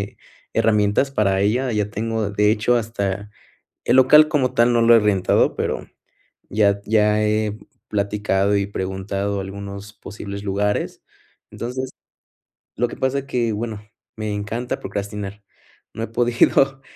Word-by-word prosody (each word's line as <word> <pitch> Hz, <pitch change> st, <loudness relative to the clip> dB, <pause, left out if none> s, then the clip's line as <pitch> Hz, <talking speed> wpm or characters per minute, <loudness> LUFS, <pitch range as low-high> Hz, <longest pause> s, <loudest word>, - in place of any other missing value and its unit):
eh, -, -, -6 dB, 0.4 s
herramientas 110 Hz, +3 st, +2 dB
para 100 Hz, -5 st, +2 dB
ella, 120 Hz, +6 st, +1 dB
ya 105 Hz, -2 st, 0 dB
tengo, 110 Hz, 0 st, -2 dB
de 105 Hz, +1 st, +3 dB
hecho, 110 Hz, +3 st, +2 dB
hasta 100 Hz, -3 st, -3 dB, 0.6 s
el -, -, +3 dB
local 150 Hz, +4 st, +7 dB
como 140 Hz, -5 st, +1 dB
tal 120 Hz, +1 st, +4 dB
no 120 Hz, -, +3 dB
lo 115 Hz, 0 st, +7 dB
he -, -, +7 dB
rentado, 105 Hz, -3 st, +2 dB
pero -, -, -3 dB, 0.6 s
ya 100 Hz, -1 st, +2 dB
ya 105 Hz, -1 st, +3 dB
he 105 Hz, 0 st, 0 dB, 0.3 s
platicado 100 Hz, -1 st, +1 dB
y 100 Hz, 0 st, -1 dB
preguntado 100 Hz, +1 st, -3 dB
algunos 100 Hz, +1 st, -8 dB
posibles 100 Hz, -1 st, -8 dB
lugares. 105 Hz, +1 st, -1 dB, 0.5 s
Entonces, 130 Hz, +2 st, -5 dB, 0.9 s
lo 120 Hz, +1 st, +2 dB
que -, -, -8 dB
pasa 130 Hz, +1 st, 0 dB
es 135 Hz, -, -7 dB
que, 120 Hz, -4 st, -1 dB
bueno, 110 Hz, -1 st, -4 dB, 0.4 s
me 110 Hz, -1 st, -3 dB
encanta 110 Hz, +5 st, -3 dB
procrastinar, 100 Hz, 0 st, -5 dB, 0.5 s
no 110 Hz, -, -6 dB
he -, -, -3 dB
podido, 120 Hz, +4 st, +2 dB
105 Hz, 140 wpm, -21 LUFS, 100-115 Hz, 0.9 s, local